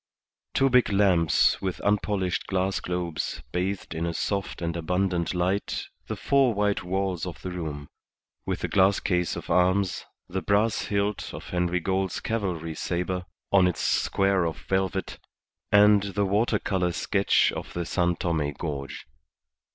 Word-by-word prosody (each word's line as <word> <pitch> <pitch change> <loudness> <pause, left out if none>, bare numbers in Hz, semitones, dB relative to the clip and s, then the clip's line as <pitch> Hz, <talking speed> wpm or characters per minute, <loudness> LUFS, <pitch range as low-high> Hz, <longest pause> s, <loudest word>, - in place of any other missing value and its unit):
Two 135 - +4
big 125 -3 +4
lamps 90 -6 +3
with 95 -2 -3
unpolished 100 -3 0
glass 95 0 0
globes 90 -2 -3
bathed 90 +1 -2
in 85 +1 -2
a 85 - -3
soft 100 -2 -2
and 85 -1 -2
abundant 90 +1 0
light 90 +3 -1 0.2
the - - -3
four 135 -5 +2
white 105 0 +1
walls 95 -1 -1
of 90 - -7
the 90 - -4
room, 75 -5 -5 0.6
with - - -3
a - - +1
glass 95 +1 +3
case 90 -3 0
of - - -6
arms, 90 +1 +2 0.2
the 95 +1 -3
brass 105 +2 +1
hilt 100 0 -1
of - - -9
Henry 90 0 0
Gould's 95 +1 -1
cavalry 90 -8 -2
sabre 90 +3 -2 0.3
on 95 -2 +5
its 90 - -2
square 95 -2 +2
of 80 -3 -2
velvet, 95 +7 -2 0.5
and 105 0 +6
the 100 0 -1
water 105 +3 +2
colour 90 -3 0
sketch 100 +3 +2
of - - -6
the 85 -1 -3
San 90 0 +1
Tome 80 -4 -1
gorge. 70 -2 -5
95 Hz, 150 wpm, -26 LUFS, 85-100 Hz, 0.6 s, and